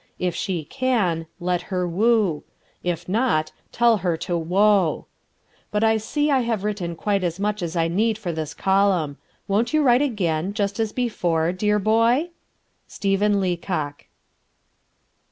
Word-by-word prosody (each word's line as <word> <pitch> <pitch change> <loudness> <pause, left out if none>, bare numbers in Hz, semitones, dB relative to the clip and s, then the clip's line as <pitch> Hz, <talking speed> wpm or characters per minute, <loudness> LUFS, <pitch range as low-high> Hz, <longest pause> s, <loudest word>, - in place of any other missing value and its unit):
If 180 -1 -1
she 175 -2 -3
can, 185 - 0
let 180 0 -1
her 180 -1 -1
woo; 200 -2 +2 0.4
if 175 -2 -3
not, 190 -6 +1 0.2
tell 235 -1 +3
her 175 -3 -1
to 175 +2 -3
whoa. 185 +1 +2 0.6
But 210 +1 0
I 220 0 +4
see 290 +7 -1
I 270 - +4
have 230 -5 -1
written 195 -5 -3
quite 200 +2 -1
as 175 +1 -2
much 210 0 -1
as 170 0 -4
I 165 -1 +2
need 215 +6 +1
for 200 -6 -4
this 155 -2 -5
column. 190 -7 +1 0.3
Won't 225 +8 +1
you 305 - +3
write 250 -1 +5
again, 195 - -1
just 200 0 -1
as 220 -1 0
before, 175 -9 0
dear 210 +3 +1
boy? 230 - +2 0.6
"STEPHEN 200 +1 +1
LEACOCK." 175 -5 -3
195 Hz, 150 wpm, -23 LUFS, 170-220 Hz, 0.6 s, write